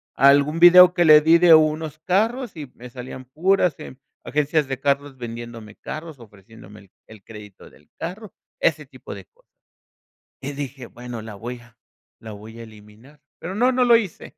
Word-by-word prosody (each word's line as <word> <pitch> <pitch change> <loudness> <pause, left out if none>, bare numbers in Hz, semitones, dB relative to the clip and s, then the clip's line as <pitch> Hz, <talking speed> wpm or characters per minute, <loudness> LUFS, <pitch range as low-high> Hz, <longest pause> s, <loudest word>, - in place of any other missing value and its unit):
algún 140 +4 +3
video 180 +1 +8
que 175 -1 +1
le 155 -1 +8
di 165 +2 +4
de 175 -2 +6
unos 155 0 0
carros 220 +7 -1
y 145 -5 -9
me 125 +1 -12
salían 130 +1 -10
puras 180 +4 0
em 130 - -11 0.3
agencias 150 0 -1
de 135 -1 -5
carros 140 -1 -2
vendiéndome 115 -2 -9
carros, 155 -2 -9
ofreciéndome 105 -1 -16
el 95 -1 -23 0.2
el 110 -3 -16
crédito 105 -2 -14
del 75 - -24
carro, 190 +5 -8 0.3
ese - - 0
tipo - - -12
de - - -12
cosas. - - -35 0.9
Y 140 - -5
dije: 140 -3 -8
"Bueno, 120 -1 -9
la 110 -1 -10
voy 120 +4 -8
a 120 -1 -22 0.4
la 110 - -11
voy 110 +2 -12
a - - -9
eliminar", 110 +6 -18 0.2
pero 185 +3 -7
no, 245 +4 +2
no 250 0 +1
lo 240 -1 +5
hice. 210 -7 -4
140 Hz, 180 wpm, -21 LUFS, 115-170 Hz, 0.9 s, video